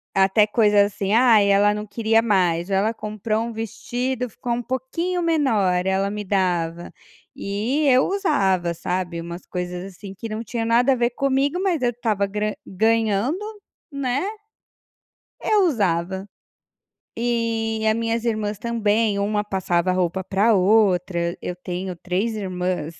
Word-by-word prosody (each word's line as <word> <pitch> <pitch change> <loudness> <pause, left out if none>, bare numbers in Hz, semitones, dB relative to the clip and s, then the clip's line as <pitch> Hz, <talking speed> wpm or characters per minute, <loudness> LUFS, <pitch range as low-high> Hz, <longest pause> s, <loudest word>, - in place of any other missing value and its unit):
até 195 +2 +4
coisa 210 -2 +4
assim, 200 0 -2
"ai 225 -4 +5
ela 205 +1 +4
não 210 0 -4
queria 225 +2 +2
mais", 180 -5 +1
ou 195 - +1
ela 215 +4 +1
comprou 215 +1 -2
um 235 0 -5
vestido, 240 +3 -3
ficou 240 +3 -4
um 240 - -1
pouquinho 330 +9 -2
menor, 220 - +1
ela 190 +1 +1
me 210 0 -4
dava. 175 -3 -1 0.4
E 225 +10 -1
eu 255 -1 +5
usava, 195 - +1
sabe, 175 0 -3
umas 170 +1 -8
coisas 180 0 -5
assim 195 +2 -10
que 210 +4 -7
não 220 +1 -4
tinha 230 0 -3
nada 240 +3 +3
a - - 0
ver 240 0 +1
comigo 275 +6 0
mas 360 -7 0
eu 245 - +2
estava 220 -4 -1
gra 210 +1 -2
ganhando, 225 - +1 0.5
né, 280 +4 -1 1.2
eu 415 -3 +3
usava. 190 - 0 0.9
E 230 -2 -1
a 215 - +3
minhas 230 0 -1
irmãs 215 -3 -1
também, 220 -2 +1
uma 210 +1 0
passava 185 -3 0
roupa 180 0 -1
para 205 +5 +2
outra, 180 -3 +2
eu 180 - -4
tenho 180 0 -5
três 190 +6 -2
irmãs. 180 -5 -3
210 Hz, 145 wpm, -22 LUFS, 190-235 Hz, 1.2 s, ai